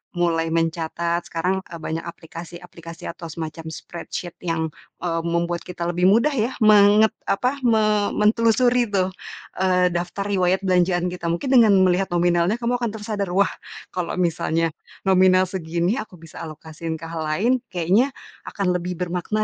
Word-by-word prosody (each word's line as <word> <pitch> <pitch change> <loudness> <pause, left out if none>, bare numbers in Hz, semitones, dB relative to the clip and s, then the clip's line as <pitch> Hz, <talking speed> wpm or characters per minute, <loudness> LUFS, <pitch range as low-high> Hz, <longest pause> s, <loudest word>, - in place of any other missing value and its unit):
mulai 165 -2 +1
mencatat, 165 +1 -1
sekarang, 180 +3 -1
eee, 170 - -9
banyak 160 0 -4
aplikasi-aplikasi 170 0 -10
atau 170 0 -9
semacam 160 0 -6
spreadsheet 170 +2 -7 0.2
yang, 160 -1 -1 0.3
eee, 165 -2 0
membuat 170 0 0
kita 175 -1 -5
lebih 175 +1 +2
mudah 230 +9 +4
ya, 245 -2 -1
menget 210 0 +6 0.2
apa, 250 +7 0
me 215 -2 +2
mentelusuri 230 +3 +3
tuh, 190 -2 0 0.5
eee, 180 -1 +3
daftar 175 +3 -3
riwayat 190 -1 +1
belanjaan 180 -1 +2
kita. 175 -1 -5
Mungkin 170 +11 -1
dengan 215 -4 +6
melihat 185 +1 +2
nominalnya 175 +3 +2
kamu 240 +1 -1
akan 235 -3 -2
tersadar, 210 -2 -3
"Wah, 200 0 +3 0.4
kalau 180 -2 -3
misalnya 165 -2 0 0.3
nominal 185 -1 +5
segini 175 +4 -1
aku 205 - -8
bisa 165 -2 -12
alokasiin 160 +1 -6
ke 160 - -11
hal 165 - -4
lain, 195 +12 +2
kayaknya, 195 +9 +1 0.3
akan 195 -3 -1
lebih 180 0 -2
bermakna 180 +5 -2
180 Hz, 150 wpm, -22 LUFS, 170-205 Hz, 0.5 s, menget